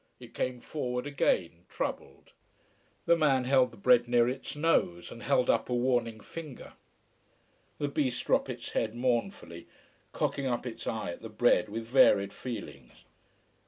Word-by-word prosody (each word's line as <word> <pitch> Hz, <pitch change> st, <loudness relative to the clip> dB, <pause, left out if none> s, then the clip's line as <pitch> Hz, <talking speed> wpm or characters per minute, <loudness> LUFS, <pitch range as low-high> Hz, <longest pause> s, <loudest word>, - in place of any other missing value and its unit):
It -, -, -13 dB
came 125 Hz, -1 st, -3 dB
forward 125 Hz, -4 st, -3 dB
again, 90 Hz, -11 st, 0 dB
troubled. -, -, -5 dB, 0.7 s
The 170 Hz, -, +5 dB
man 140 Hz, -5 st, +2 dB
held 130 Hz, 0 st, +3 dB
the 115 Hz, -, -16 dB
bread 120 Hz, +3 st, +4 dB
near 120 Hz, -1 st, +4 dB
its 130 Hz, +3 st, -4 dB
nose, 145 Hz, -, +1 dB
and 115 Hz, -, -10 dB
held 125 Hz, -, +2 dB
up 115 Hz, -, +1 dB
a 125 Hz, -, 0 dB
warning 120 Hz, -3 st, 0 dB
finger. 155 Hz, -1 st, -9 dB, 1.0 s
The 145 Hz, -, -1 dB
beast 135 Hz, -3 st, -1 dB
dropped -, -, +2 dB
its 120 Hz, -2 st, -6 dB
head 110 Hz, 0 st, -1 dB
mournfully, 120 Hz, -, -2 dB, 0.4 s
cocking 140 Hz, -1 st, -1 dB
up 120 Hz, 0 st, -2 dB
its 120 Hz, -, -7 dB
eye 110 Hz, -5 st, -2 dB
at -, -, -9 dB
the 115 Hz, -, -8 dB
bread 110 Hz, -1 st, +2 dB
with 115 Hz, +2 st, -5 dB
varied 100 Hz, -5 st, +4 dB
feelings. 120 Hz, -5 st, -8 dB
125 Hz, 155 wpm, -30 LUFS, 115-130 Hz, 1.0 s, The